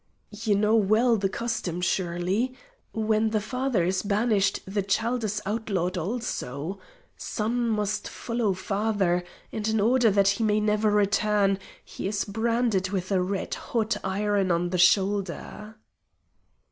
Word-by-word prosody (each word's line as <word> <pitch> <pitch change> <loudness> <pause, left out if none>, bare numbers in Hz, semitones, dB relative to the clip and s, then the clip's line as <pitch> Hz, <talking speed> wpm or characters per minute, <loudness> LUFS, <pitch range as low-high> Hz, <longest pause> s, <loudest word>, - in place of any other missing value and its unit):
"You 210 0 0
know 210 +2 +3
well 225 +3 +4
the 195 -2 0
custom, 190 -5 -3
surely? 185 +7 -1 0.4
When 220 0 +1
the 215 0 +1
father 250 -1 -1
is 185 +2 0
banished 205 -1 +1
the 200 +2 -1
child 225 +5 0
is 210 0 -2
outlawed 195 -4 -1
also. 180 - -4 0.4
Son 235 +2 -2
must 210 -1 -1
follow 230 -4 -1
father, 195 -2 0 0.3
and 215 -1 -3
in 220 0 +1
order 235 +2 +4
that 200 -1 +4
he 200 +3 0
may 210 -1 +2
never 210 0 +2
return, 205 -1 +2 0.3
he - - -5
is 200 0 -1
branded 225 -2 0
with 185 -1 -3
a 190 -2 +3
red 190 +2 -2
hot 225 -1 -1
iron 200 0 0
on 175 0 +1
the 180 - 0
shoulder." 200 +3 +1
210 Hz, 140 wpm, -26 LUFS, 190-220 Hz, 0.4 s, well